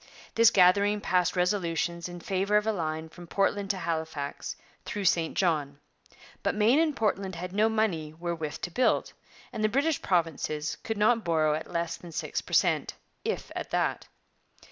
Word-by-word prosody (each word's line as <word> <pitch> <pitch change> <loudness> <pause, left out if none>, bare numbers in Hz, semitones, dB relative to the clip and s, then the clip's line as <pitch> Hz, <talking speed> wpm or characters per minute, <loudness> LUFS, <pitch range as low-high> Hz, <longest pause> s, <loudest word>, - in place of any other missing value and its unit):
This 230 0 +6
gathering 200 +2 +4
passed 180 -2 +1
resolutions 175 -2 0
in 175 0 -8
favour 195 +3 +1
of 210 - +1
a 220 - +2
line 160 -4 -3
from 175 +2 -12
Portland 195 +2 0
to 200 - 0
Halifax 160 -4 -3 0.3
through 205 -2 -4
St 165 -2 +2
John. 150 -6 +1 0.6
But - - 0
Maine 220 +7 +4
and 315 -3 +2
Portland 195 -5 -1
had 180 +2 -6
no 215 +2 +3
money 210 -9 0
wherewith 165 -2 -4
to 175 - -4
build, 250 +7 +1 0.4
and 215 - -3
the 215 - +3
British 285 +6 +1
provinces 160 -3 -1
could 225 -1 -3
not 220 +2 +3
borrow 155 -2 +2
at 155 +1 -4
less 170 0 -2
than 175 - -11
six - - -3
per - - -11
cent, - - +2 0.3
if - - -3
at - - -4
that. - - -1
180 Hz, 170 wpm, -28 LUFS, 165-210 Hz, 0.6 s, This